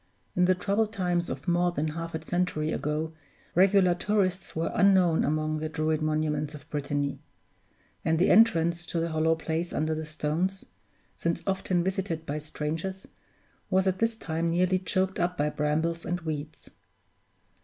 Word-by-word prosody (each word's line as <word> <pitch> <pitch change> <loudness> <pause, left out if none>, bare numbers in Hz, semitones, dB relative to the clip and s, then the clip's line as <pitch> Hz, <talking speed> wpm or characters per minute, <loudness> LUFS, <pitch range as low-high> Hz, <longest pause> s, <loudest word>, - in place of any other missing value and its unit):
In 180 - +4
the 185 0 +4
troubled 205 +4 0
times 180 -4 0
of 130 +2 -6
more 175 0 +3
than 155 -2 -1
half 165 +1 -5
a 160 0 -5
century 175 -3 0
ago, 155 +2 -2 0.4
regular 185 0 +5
tourists 190 -1 0
were 160 +1 -1
unknown 185 -4 +4
among 155 +1 0
the 155 0 -3
Druid 155 0 0
monuments 155 -1 -1
of 145 - -12
Brittany; 145 -1 -2 0.8
and 160 0 +2
the 175 - +4
entrance 170 -5 +4
to 170 - -2
the 165 +1 -1
hollow 160 0 +2
place 165 +1 -3
under 155 +1 0
the 155 0 -4
stones 160 +5 -2 0.5
since 170 0 -2
often 190 -2 0
visited 185 -3 -2
by 150 +1 -3
strangers 160 +5 -4 0.6
was 190 0 +3
at 190 -1 +1
this 230 0 +1
time 165 -5 -2
nearly 180 +2 +2
choked 190 +1 -1
up 175 +1 0
by 150 +1 +1
brambles 160 +3 0
and 175 +1 -2
weeds. 155 -1 -6
165 Hz, 160 wpm, -28 LUFS, 155-185 Hz, 0.8 s, regular